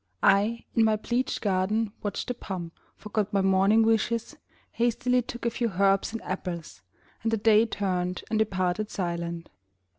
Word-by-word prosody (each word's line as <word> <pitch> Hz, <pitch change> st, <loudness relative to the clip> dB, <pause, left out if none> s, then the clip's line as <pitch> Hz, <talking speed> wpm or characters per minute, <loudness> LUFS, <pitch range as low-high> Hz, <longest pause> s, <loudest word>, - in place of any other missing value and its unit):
I, 210 Hz, +4 st, +3 dB
in 230 Hz, -, +5 dB
my 220 Hz, -1 st, +4 dB
pleached 240 Hz, +4 st, -1 dB
garden, 205 Hz, +2 st, +1 dB
watched 205 Hz, -, -3 dB
the -, -, 0 dB
pomp, 180 Hz, -7 st, -6 dB, 0.2 s
Forgot 210 Hz, -1 st, -2 dB
my 200 Hz, -, +2 dB
morning 195 Hz, +4 st, +4 dB
wishes, 225 Hz, +1 st, +1 dB, 0.4 s
hastily 245 Hz, +1 st, +1 dB
Took 240 Hz, 0 st, -8 dB
a 235 Hz, -, +2 dB
few 230 Hz, -2 st, -2 dB
herbs 195 Hz, +1 st, +3 dB
and 230 Hz, -, -6 dB
apples, 180 Hz, -3 st, -5 dB, 0.4 s
and 225 Hz, -, 0 dB
the 225 Hz, -, +2 dB
Day 220 Hz, +1 st, +4 dB
Turned 185 Hz, -4 st, -2 dB
and 220 Hz, -, +1 dB
departed 195 Hz, 0 st, 0 dB
silent. 170 Hz, -2 st, -4 dB
210 Hz, 155 wpm, -27 LUFS, 185-225 Hz, 0.4 s, in